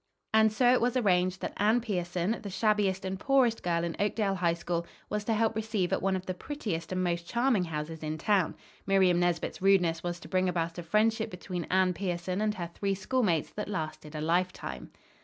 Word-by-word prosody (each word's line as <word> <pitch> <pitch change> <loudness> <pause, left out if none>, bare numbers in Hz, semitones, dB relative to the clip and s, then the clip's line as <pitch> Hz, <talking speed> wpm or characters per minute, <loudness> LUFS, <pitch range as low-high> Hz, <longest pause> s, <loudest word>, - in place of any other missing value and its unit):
And 220 0 +5
so 245 +3 +4
it 255 - +3
was 245 +1 +2
arranged 185 -5 +2
that - - -3
Anne 215 +4 +3
Pierson, 185 -1 -2
the 205 - -6
shabbiest 200 -2 +1
and 190 0 -3
poorest 260 -3 +3
girl 170 -1 0
in 170 -1 -2
Oakdale 205 -1 +1
High 175 -3 +1
School, 170 0 -3 0.2
was 210 0 -1
to 225 - +1
help 225 0 +1
receive 215 -5 -1
at - - 0
one 195 0 +1
of 185 0 -4
the 185 - -2
prettiest 195 - -4
and 185 0 0
most 170 -1 -1
charming 240 -6 +2
houses 160 0 -5
in 155 0 -3
town. 195 0 +1 0.3
Miriam 190 -3 +4
Nesbit's 175 -1 -1
rudeness 180 -4 +3
was 175 0 -4
to - - -10
bring 185 0 +1
about 165 -1 -2
a - - -3
friendship 220 +6 +1
between 180 -2 -5
Anne 185 0 +3
Pierson 180 +1 -2
and 215 0 +1
her 170 -3 -5
three 195 +1 -1
schoolmates 195 - 0
that 210 - -5
lasted 155 -5 -5
a 150 - -3
lifetime. 165 - -1
185 Hz, 205 wpm, -29 LUFS, 170-215 Hz, 0.3 s, And